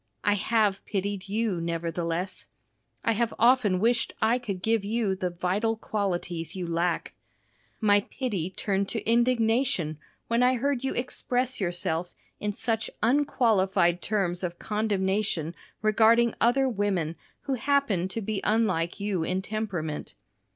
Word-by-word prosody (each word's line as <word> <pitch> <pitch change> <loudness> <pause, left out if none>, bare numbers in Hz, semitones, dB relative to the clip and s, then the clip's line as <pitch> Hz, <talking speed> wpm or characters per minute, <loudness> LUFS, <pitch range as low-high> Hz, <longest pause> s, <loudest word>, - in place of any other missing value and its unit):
I 205 - +4
have 210 -1 +1
pitied 200 -1 -3
you, 210 -4 0
nevertheless. 170 +2 -2 0.6
I 230 - +4
have 230 +1 0
often 230 -5 +4
wished 230 +3 +1
I 230 +3 +3
could 200 -7 -5
give 225 -2 +2
you 210 -2 0
the 185 -1 -2
vital 185 +6 0
qualities 175 -6 -2
you 185 -2 -3
lack. 170 +1 -1 0.7
My 205 -2 +5
pity 205 - -2
turned 195 +1 -1
to 225 - -4
indignation 230 - +2 0.3
when 235 +1 +2
I 250 +1 +4
heard 265 +1 0
you 270 - -1
express 250 0 -1
yourself 175 -1 -2 0.2
in 210 - -1
such 225 +1 -1
unqualified 200 -9 +3
terms 190 -4 -1
of 175 -1 -3
condemnation 195 -5 -1 0.3
regarding 225 +2 +4
other 265 +3 +4
women 195 -8 -1 0.3
who 275 - -2
happened 255 -9 +1
to 225 +5 -4
be 210 -1 -2
unlike 190 -7 +1
you 200 -4 -1
in 185 +3 -1
temperament. 185 - -4
205 Hz, 135 wpm, -27 LUFS, 180-230 Hz, 0.7 s, My